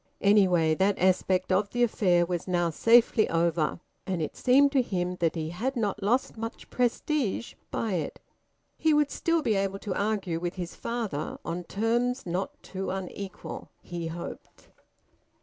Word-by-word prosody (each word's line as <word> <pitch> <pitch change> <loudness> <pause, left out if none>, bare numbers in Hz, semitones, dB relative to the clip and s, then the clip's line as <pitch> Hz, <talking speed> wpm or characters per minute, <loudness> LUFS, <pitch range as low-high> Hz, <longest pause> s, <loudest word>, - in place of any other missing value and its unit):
Anyway, 185 -6 +4
that 195 +4 +2
aspect 185 0 +2
of 200 +2 +2
the 245 +2 +1
affair 180 -6 +3
was 175 0 -3
now 175 -2 +1
safely 230 +4 +4
over, 165 -1 +1 0.3
and 185 -2 -1
it 155 - -3
seemed 275 +2 +4
to 275 -2 +4
him 180 -6 -2
that 165 -1 +1
he 160 -1 -3
had 250 +10 -2
not 210 -3 -1
lost 235 +7 +1
much 225 +1 -6
prestige 250 -1 0 0.2
by 220 -3 -2
it. 160 -5 -3 0.6
He 315 -1 +4
would 295 -1 +2
still 330 -1 +1
be 230 -5 +2
able 195 -1 0
to 195 -1 -4
argue 200 -5 -1
with 175 +1 -3
his 175 -2 -5
father 220 -11 -3
on 175 +1 -4
terms 240 +6 0
not 180 +2 -3
too 190 0 -5
unequal, 190 0 -6
he 170 -1 -5
hoped. 170 +1 -8
195 Hz, 160 wpm, -28 LUFS, 175-230 Hz, 0.6 s, Anyway